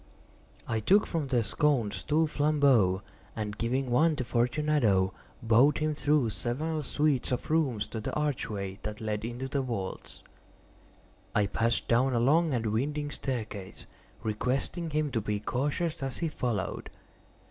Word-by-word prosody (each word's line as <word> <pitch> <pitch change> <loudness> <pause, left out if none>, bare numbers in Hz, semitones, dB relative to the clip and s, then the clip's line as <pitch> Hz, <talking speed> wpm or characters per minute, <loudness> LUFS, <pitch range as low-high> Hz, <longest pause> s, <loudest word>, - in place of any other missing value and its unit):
I 115 -1 0
took 200 - +4
from 160 -5 -2
their 125 -3 +2
sconces 120 -5 0
two 155 +2 +2
flambeaux, 140 -11 +3 0.3
and 105 -2 -3
giving 125 +3 -1
one 155 +6 +4
to 140 - -2
Fortunato, 120 -6 +2 0.3
bowed 120 +6 +5
him 155 0 0
through 145 -5 +2
several 145 - -2
suites 145 -2 +1
of 125 +4 -2
rooms 140 -10 +1
to 115 - -4
the 110 - -4
archway 105 -10 -2
that 105 0 -5
led 105 -1 -3
into 120 +3 -4
the 140 +1 -1
vaults. 115 -7 -5 1.1
I 105 -2 +4
passed 115 +3 +1
down 125 +2 +3
a - - +3
long 155 +7 +3
and 120 -3 -1
winding 145 +5 -1
staircase, 110 -9 -5 0.4
requesting 130 - -1
him 150 -1 0
to 115 - 0
be 105 0 -2
cautious 145 - -1
as 135 -2 -2
he 165 - -1
followed. 115 -9 -3
125 Hz, 145 wpm, -29 LUFS, 110-150 Hz, 1.1 s, bowed